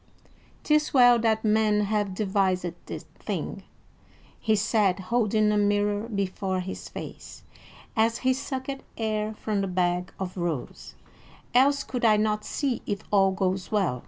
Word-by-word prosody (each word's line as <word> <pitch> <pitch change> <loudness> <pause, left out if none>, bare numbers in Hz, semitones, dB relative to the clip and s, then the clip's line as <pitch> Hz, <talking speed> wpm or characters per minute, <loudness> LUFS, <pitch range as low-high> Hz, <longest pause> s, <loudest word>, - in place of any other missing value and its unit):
"'Tis 300 -1 +2
well 245 -2 +7
that 220 -1 +1
men 215 -1 +3
have 205 -2 -1
devised 190 -3 +1 0.2
this - - -6 0.2
thing," - - -4 0.8
he 220 -1 +2
said, 205 -2 +2
holding 215 +1 +1
a 210 - +2
mirror 205 +1 +1
before 190 -2 -2
his 185 +1 -6
face, - - -9 0.5
as 225 0 +2
he 260 - +5
sucked 270 0 -4 0.2
air 215 -1 -1
from 210 -2 -2
the 195 - -1
bag 180 0 0
of 185 -1 -4
rose; 170 -7 -4 0.6
"else 280 +3 +4
could 250 -2 -5
I 215 -2 +5
not 210 0 0
see 275 -5 -2
if 205 -1 -3
all 195 -2 +5
goes 190 0 -1
well." 190 -12 +1
210 Hz, 145 wpm, -26 LUFS, 190-225 Hz, 0.8 s, well